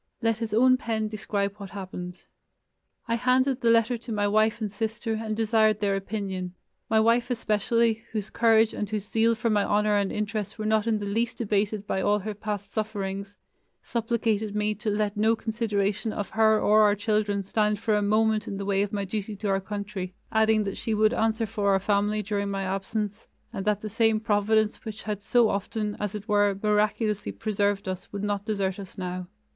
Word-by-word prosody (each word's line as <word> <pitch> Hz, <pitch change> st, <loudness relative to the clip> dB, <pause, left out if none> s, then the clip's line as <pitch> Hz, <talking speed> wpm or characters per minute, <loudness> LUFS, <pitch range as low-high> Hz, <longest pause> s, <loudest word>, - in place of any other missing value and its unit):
Let 225 Hz, -2 st, 0 dB
his 225 Hz, -2 st, -3 dB
own 255 Hz, +4 st, +5 dB
pen 220 Hz, -4 st, -2 dB
describe 200 Hz, -1 st, -2 dB
what 200 Hz, -2 st, -8 dB
happened: 185 Hz, -2 st, -7 dB, 0.8 s
"I 230 Hz, -, 0 dB
handed 255 Hz, +2 st, +2 dB
the 235 Hz, -, +3 dB
letter 230 Hz, +1 st, +3 dB
to 235 Hz, -, -9 dB
my 205 Hz, -1 st, +1 dB
wife 215 Hz, +2 st, +2 dB
and 215 Hz, -3 st, -3 dB
sister 225 Hz, +2 st, -3 dB
and 220 Hz, -1 st, -3 dB
desired 220 Hz, -1 st, +3 dB
their 200 Hz, -2 st, +1 dB
opinion.... 190 Hz, -2 st, -4 dB, 0.3 s
My 220 Hz, -, +4 dB
wife 230 Hz, +3 st, +3 dB
especially, 230 Hz, 0 st, +1 dB
whose 215 Hz, -2 st, -4 dB
courage 225 Hz, -1 st, +4 dB
and 210 Hz, -, -3 dB
whose 210 Hz, -1 st, -3 dB
zeal 230 Hz, +1 st, +2 dB
for 225 Hz, +1 st, 0 dB
my 205 Hz, -1 st, +3 dB
honor 210 Hz, +1 st, +2 dB
and 200 Hz, -1 st, 0 dB
interest 210 Hz, -1 st, -3 dB
were 215 Hz, -, -4 dB
not 220 Hz, 0 st, +2 dB
in 225 Hz, -2 st, +2 dB
the 205 Hz, -, -4 dB
least 225 Hz, +4 st, -1 dB
abated 210 Hz, -1 st, 0 dB
by 190 Hz, -, -1 dB
all 205 Hz, +2 st, +3 dB
her 210 Hz, +1 st, -4 dB
past 205 Hz, -1 st, -5 dB
sufferings, 200 Hz, -2 st, -3 dB, 0.5 s
supplicated 225 Hz, -3 st, -1 dB
me 210 Hz, 0 st, +1 dB
to 215 Hz, +1 st, -4 dB
let 210 Hz, 0 st, 0 dB
no 220 Hz, +2 st, +3 dB
consideration 215 Hz, -2 st, -1 dB
of 205 Hz, -2 st, -4 dB
her 220 Hz, -1 st, +4 dB
or 215 Hz, +1 st, +5 dB
our 205 Hz, -1 st, +5 dB
children 205 Hz, -1 st, 0 dB
stand 210 Hz, +1 st, 0 dB
for 225 Hz, 0 st, 0 dB
a 210 Hz, -, +2 dB
moment 215 Hz, +1 st, +2 dB
in 195 Hz, -, -4 dB
the 200 Hz, -, -4 dB
way 195 Hz, -1 st, +1 dB
of 205 Hz, -, -1 dB
my 200 Hz, -1 st, -2 dB
duty 210 Hz, +2 st, -4 dB
to 205 Hz, +1 st, -3 dB
our 195 Hz, 0 st, +1 dB
country, 200 Hz, -2 st, -5 dB, 0.2 s
adding 220 Hz, 0 st, +3 dB
that 195 Hz, -1 st, -4 dB
she 225 Hz, -, -1 dB
would 215 Hz, +2 st, +3 dB
answer 225 Hz, -1 st, +1 dB
for 205 Hz, -1 st, -1 dB
our 195 Hz, -, +3 dB
family 205 Hz, +2 st, +1 dB
during 200 Hz, 0 st, -2 dB
my 195 Hz, 0 st, -2 dB
absence 205 Hz, +2 st, -3 dB, 0.3 s
and 195 Hz, -, -4 dB
that 210 Hz, -1 st, +1 dB
the 215 Hz, -, -4 dB
same 225 Hz, +1 st, +2 dB
Providence 215 Hz, 0 st, +1 dB
which 220 Hz, -1 st, -7 dB
had 210 Hz, -2 st, -3 dB
so 235 Hz, +3 st, +4 dB
often, 210 Hz, +1 st, -2 dB
as 210 Hz, 0 st, -3 dB
it 210 Hz, +1 st, -7 dB
were, 205 Hz, -2 st, +3 dB
miraculously 210 Hz, -, +1 dB
preserved 200 Hz, -, -1 dB
us 185 Hz, 0 st, -5 dB
would 200 Hz, 0 st, -5 dB
not 205 Hz, -1 st, -1 dB
desert 195 Hz, -3 st, -1 dB
us 195 Hz, -2 st, -10 dB
now." 180 Hz, -1 st, -4 dB
210 Hz, 200 wpm, -26 LUFS, 200-220 Hz, 0.8 s, own